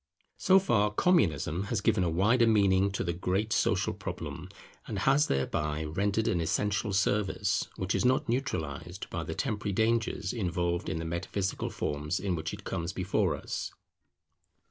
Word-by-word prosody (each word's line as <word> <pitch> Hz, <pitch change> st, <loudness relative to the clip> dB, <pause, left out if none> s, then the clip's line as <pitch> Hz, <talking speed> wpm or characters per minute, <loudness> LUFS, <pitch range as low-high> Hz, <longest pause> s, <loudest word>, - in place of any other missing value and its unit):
So 190 Hz, -, +5 dB
far 115 Hz, -, +3 dB
Communism 100 Hz, -, +2 dB
has 105 Hz, +1 st, -1 dB
given 100 Hz, -3 st, +2 dB
a 85 Hz, -, +1 dB
wider 110 Hz, +8 st, +3 dB
meaning 100 Hz, -3 st, +4 dB
to -, -, -1 dB
the 85 Hz, -, -1 dB
great 95 Hz, +5 st, -1 dB
social -, -, +1 dB
problem, 90 Hz, +3 st, -6 dB, 0.4 s
and 105 Hz, -, -4 dB
has 135 Hz, +9 st, +3 dB
thereby 75 Hz, +3 st, -1 dB
rendered 100 Hz, +7 st, 0 dB
an 85 Hz, -, +1 dB
essential 105 Hz, +6 st, 0 dB
service, 100 Hz, 0 st, +1 dB
which 95 Hz, +1 st, -2 dB
is -, -, +1 dB
not 130 Hz, +1 st, +2 dB
neutralized 115 Hz, -, -3 dB
by -, -, -3 dB
the -, -, -5 dB
temporary 105 Hz, -1 st, -2 dB
dangers 110 Hz, -2 st, 0 dB
involved 85 Hz, -4 st, -1 dB
in -, -, -2 dB
the 80 Hz, -, -4 dB
metaphysical 85 Hz, +3 st, -2 dB
forms 75 Hz, +4 st, -2 dB
in 100 Hz, -3 st, -1 dB
which 80 Hz, -1 st, -3 dB
it -, -, -8 dB
comes 85 Hz, +1 st, -3 dB
before 95 Hz, +1 st, 0 dB
us. -, -, -5 dB
95 Hz, 160 wpm, -30 LUFS, 85-110 Hz, 0.4 s, So